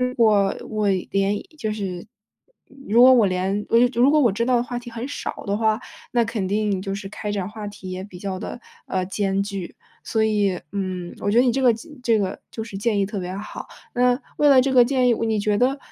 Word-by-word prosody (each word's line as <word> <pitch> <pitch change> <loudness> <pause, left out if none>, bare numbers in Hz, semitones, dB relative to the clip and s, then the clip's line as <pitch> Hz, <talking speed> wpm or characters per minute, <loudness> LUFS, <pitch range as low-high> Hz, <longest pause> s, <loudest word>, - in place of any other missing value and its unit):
是 250 0 0
我 210 -4 +4
我 215 -2 0
连 195 +1 0 0.2
就 220 -7 -2
是 190 -4 -4 0.8
如 225 +4 +4
果 255 +1 +9
我 235 -4 +5
连 190 +2 -1
哦 230 - +4
又 245 +1 +5
就 240 -1 0
如 270 - +6
果 305 - +4
我 240 -7 +4
知 230 +4 0
道 250 0 +2
的 235 - +2
话 245 0 -4
题 240 0 -10
很 230 +2 -5
少 285 - -5
的 200 0 0
话， 220 +1 +1 0.3
那 240 -1 +2
肯 210 -4 -3
定 205 -2 0
就 195 0 -4
是 195 0 -5
开 210 +1 -5
展 200 -2 -2
话 215 -1 -7
题 205 -2 -10
也 185 0 -5
比 190 -2 -10
较 190 0 -4
地， 245 - -6 0.3
呃， 185 -1 -1
艰 195 0 -1
巨。 195 -3 -6 0.3
所 220 -1 +1
以， 205 -4 +1
嗯， 185 -3 -4
我 205 - 0
觉 225 - +3
得 245 - +6
你 245 - +3
这 265 +2 -1
个 245 -2 +6
建 240 +8 -9
这 230 -2 +3
个 195 -2 -2
就 220 - -5
是 210 -3 -8
建 205 +1 0
议 195 - +2
特 205 -1 -4
别 180 +1 -5
好， 210 - -7 0.3
那 250 +1 +3 0.2
为 295 - +4
了 265 -2 +7
这 265 +1 0
个 250 -2 +7
建 255 0 +2
议， 240 - +5
你 225 -1 0
觉 205 0 +1
得， 260 +5 +2
215 Hz, 265 characters per minute, -23 LUFS, 195-240 Hz, 0.8 s, 果